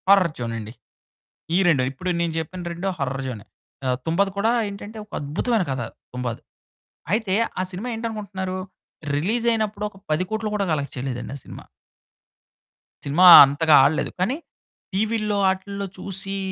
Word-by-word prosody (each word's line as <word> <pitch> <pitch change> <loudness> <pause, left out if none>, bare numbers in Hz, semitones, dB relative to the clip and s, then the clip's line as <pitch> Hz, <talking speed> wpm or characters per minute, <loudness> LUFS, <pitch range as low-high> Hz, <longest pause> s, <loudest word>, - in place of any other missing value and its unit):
Horror 195 -4 +6
జోనండి. 115 -2 -5 0.8
ఈ - - +5
2 140 -7 +4
ఇప్పుడు 180 +7 -4
నేను 170 -1 0
చెప్పిన 165 +3 -5
2 175 +3 -3
హర్రర్ 135 -1 -2
జోనే. 110 -5 -6 0.4
ఆహ్, 125 -1 +1
'తుంబాద్' 190 +5 +1
కూడా 220 +3 +2 0.2
ఏంటంటే, 205 +2 -8
ఒక 210 - -31
అద్భుతమైన 185 +9 0
కథ. 130 -1 -2 0.3
'తుంబాద్' 125 -2 -4 0.7
అయితే, 215 -4 0 0.3
ఆ - - +2
సినిమా 200 +7 -5
ఏంటనుకుంటున్నారు 200 -5 -4 0.6
రిలీజ్ 220 +10 0
అయినప్పుడు, 215 -2 -1
ఒక 195 - -20 0.2
10,00,00,000 210 +7 -1
కూడా 200 -1 0
కలెక్ట్ 140 -2 -2
చేయలేదండి 125 0 -4
ఆ - - -8
సినిమా. - - -10 1.4
సినిమా 150 +6 +4 0.2
అంతగా 150 +3 +3
ఆడలేదు. 150 +3 +1
కానీ 225 +10 0 0.6
టీవీల్లో, 215 +1 0
ఆటిల్లో 200 +1 -3
చూసీ, 195 0 -3
185 Hz, 140 wpm, -23 LUFS, 140-210 Hz, 1.4 s, Horror